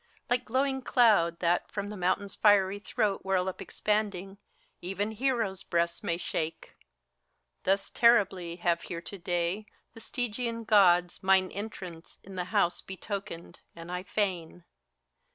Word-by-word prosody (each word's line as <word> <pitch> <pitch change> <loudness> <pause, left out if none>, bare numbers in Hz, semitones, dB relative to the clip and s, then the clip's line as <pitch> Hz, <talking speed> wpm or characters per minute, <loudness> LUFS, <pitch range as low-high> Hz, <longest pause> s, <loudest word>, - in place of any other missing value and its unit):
Like 245 0 +2
glowing 265 +2 0
clouds 215 -10 +4
that 175 0 +1
from 200 -1 -4
the - - -6
mountain's 190 +2 -1
fiery 205 -2 +4
throat 205 0 -1
Whirl 190 -1 +1
up 190 - -4
expanding, 200 -2 -2 0.4
even 195 +4 -2
heroes' 225 -5 -1
breasts 170 0 -1
may 170 - -1
shake. 165 -2 -4 0.9
Thus 195 +1 +1
terribly 195 -7 +3
have 175 -1 0
here 170 -1 -6
to 200 - -8
day 175 +3 -1 0.3
the 225 - -12
Stygian 230 -1 -3
Gods 180 -5 +4
Mine 190 -1 +3
entrance 185 -5 -8
in 195 - -11
the 180 -1 -3
house 185 -2 +1
betokened, 190 -3 -7 0.2
and 170 +1 -9
I 180 0 -2
fain. 180 -4 -2
195 Hz, 135 wpm, -29 LUFS, 175-210 Hz, 0.9 s, clouds